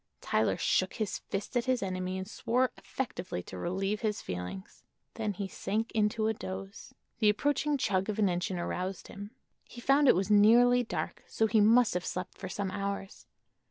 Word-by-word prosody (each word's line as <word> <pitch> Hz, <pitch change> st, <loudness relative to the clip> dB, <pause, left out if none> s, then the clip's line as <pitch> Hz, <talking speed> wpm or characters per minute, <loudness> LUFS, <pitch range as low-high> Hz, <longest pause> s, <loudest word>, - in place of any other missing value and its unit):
Tyler -, -, +1 dB
shook -, -, +1 dB
his 215 Hz, -4 st, -2 dB
fist 200 Hz, +6 st, -5 dB
at 240 Hz, -1 st, +1 dB
his 255 Hz, -3 st, +1 dB
enemy 185 Hz, 0 st, -2 dB
and 190 Hz, 0 st, -5 dB
swore 250 Hz, +4 st, 0 dB
effectively 185 Hz, -, -5 dB
to -, -, -9 dB
relieve 195 Hz, -, -2 dB
his 215 Hz, -2 st, -1 dB
feelings. 90 Hz, +1 st, -7 dB, 0.3 s
Then 215 Hz, -2 st, -2 dB
he 195 Hz, +1 st, -4 dB
sank 215 Hz, +4 st, -2 dB
into 215 Hz, 0 st, +1 dB
a 220 Hz, -, +2 dB
doze. 195 Hz, +3 st, -7 dB, 0.3 s
The 215 Hz, -2 st, +5 dB
approaching 290 Hz, +6 st, +1 dB
chug 195 Hz, -5 st, 0 dB
of 210 Hz, -, -2 dB
an 210 Hz, -2 st, +3 dB
engine 180 Hz, +1 st, -1 dB
aroused 180 Hz, +2 st, -4 dB
him. 205 Hz, +1 st, -8 dB, 0.3 s
He 245 Hz, -, -12 dB
found 275 Hz, +3 st, +4 dB
it -, -, +7 dB
was 195 Hz, +3 st, 0 dB
nearly 240 Hz, +4 st, +6 dB
dark, 230 Hz, -, -4 dB
so 225 Hz, -, +1 dB
he 220 Hz, 0 st, +3 dB
must 230 Hz, +3 st, +5 dB
have 180 Hz, -, -1 dB
slept 180 Hz, 0 st, -4 dB
for 190 Hz, -, -5 dB
some 195 Hz, 0 st, -3 dB
hours. 200 Hz, 0 st, -4 dB
205 Hz, 185 wpm, -30 LUFS, 190-230 Hz, 0.3 s, it